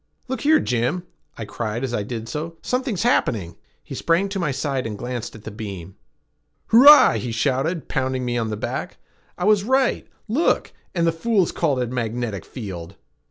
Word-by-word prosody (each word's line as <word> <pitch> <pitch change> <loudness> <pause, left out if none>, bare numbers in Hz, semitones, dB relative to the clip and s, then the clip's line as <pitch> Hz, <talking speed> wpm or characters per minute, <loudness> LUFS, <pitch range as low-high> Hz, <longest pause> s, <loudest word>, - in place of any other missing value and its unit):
"Look 260 +1 -3
here, 310 +1 +5
Jim!" 125 +9 -1 0.3
I 115 - -5
cried 110 +3 -4
as 130 -2 -2
I 105 - 0
did 115 +2 -5
so. 160 +7 -5
"Something's 250 -6 -1
happening!" 105 - +1 0.3
He - - -9
sprang 170 +4 +1
to 195 0 -3
my 170 -5 0
side 135 -2 -2
and 105 -2 -5
glanced 120 0 -5
at 110 - -12
the 110 - -7
beam. 100 -4 -7 0.7
"Hurrah!" 285 +6 +8
he 125 - -4
shouted, 140 +8 -1
pounding 130 -2 -1
me 120 0 -1
on 115 -2 -1
the 105 - -3
back. - - -4 0.4
"I 180 - -4
was 210 -2 +4
right! 260 +3 +1 0.2
Look! 260 +10 +1 0.2
And 170 -1 +2
the 165 - +3
fools 190 +2 +1
called 150 -6 0
it 125 - -2
a - - -7
magnetic 115 -5 -3
field!" 95 -7 -7
130 Hz, 185 wpm, -22 LUFS, 115-180 Hz, 0.7 s, Hurrah